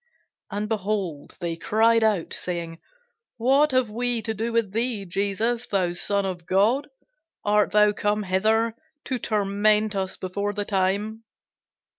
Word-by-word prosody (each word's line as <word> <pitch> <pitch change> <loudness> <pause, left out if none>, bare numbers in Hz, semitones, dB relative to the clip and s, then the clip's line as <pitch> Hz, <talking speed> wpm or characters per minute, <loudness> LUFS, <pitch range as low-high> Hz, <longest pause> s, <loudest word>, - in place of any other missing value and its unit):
And, 205 +1 -3
behold, 200 -8 -3
they 170 -1 -2
cried 225 +5 +3
out, 210 -6 +1
saying, 170 -2 -4 0.6
What 270 +6 +4
have 255 -4 +1
we 240 0 -1
to 220 - -1
do 225 +3 -3
with 230 -4 +1
thee, 225 -3 -1
Jesus, 205 +6 -1
thou 185 -3 0
Son 200 +3 0
of 175 -3 -5
God? 215 +10 +2 0.6
art 210 0 +3
thou 210 0 +5
come 210 +1 0
hither 220 +4 +1 0.3
to 255 -2 -2
torment 210 0 +1
us 190 -1 -2
before 200 +2 -3
the 205 0 -3
time? 205 +3 -1
210 Hz, 140 wpm, -25 LUFS, 195-225 Hz, 0.6 s, thou